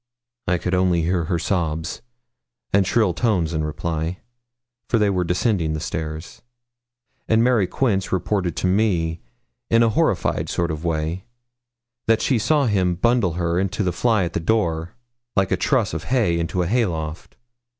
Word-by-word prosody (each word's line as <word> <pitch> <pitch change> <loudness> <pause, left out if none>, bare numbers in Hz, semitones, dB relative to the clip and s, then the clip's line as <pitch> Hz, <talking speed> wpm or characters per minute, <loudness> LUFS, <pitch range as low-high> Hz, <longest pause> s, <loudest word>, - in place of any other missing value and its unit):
I 90 0 +2
could 90 +2 -3
only 90 -2 +2
hear 85 0 0
her 85 - 0
sobs 80 -2 -2 0.7
and 95 -2 +4
shrill 105 -5 +2
tones 90 -6 0
in 80 -1 -1
reply, 80 +2 -3 0.7
for 115 - +3
they 105 -2 +3
were 90 -2 +1
descending 90 -2 0
the 80 - -2
stairs; 80 +1 -5 0.9
and 110 +1 +3
Mary 120 -6 +3
Quince 100 -6 0
reported 95 -2 -1
to - - -2
me, 90 -4 +1 0.5
in 115 0 +5
a 115 - +4
horrified 110 - 0
sort 85 -1 -1
of 80 +1 -5
way, 80 +2 -2 0.8
that 115 0 +4
she 130 -4 +2
saw 145 +6 +2
him 95 -6 +1
bundle 115 -2 +2
her 85 0 0
into 100 +3 -1
the 90 -2 0
fly 110 -5 +2
at 85 -1 -3
the - - 0
door, 85 -3 0 0.4
like 95 -2 +2
a - - +4
truss - - +1
of 80 +1 -4
hay 105 -9 +1
into 85 +2 -1
a - - -2
hay 115 +3 +2
loft. 80 -1 -6
90 Hz, 170 wpm, -22 LUFS, 80-105 Hz, 0.9 s, in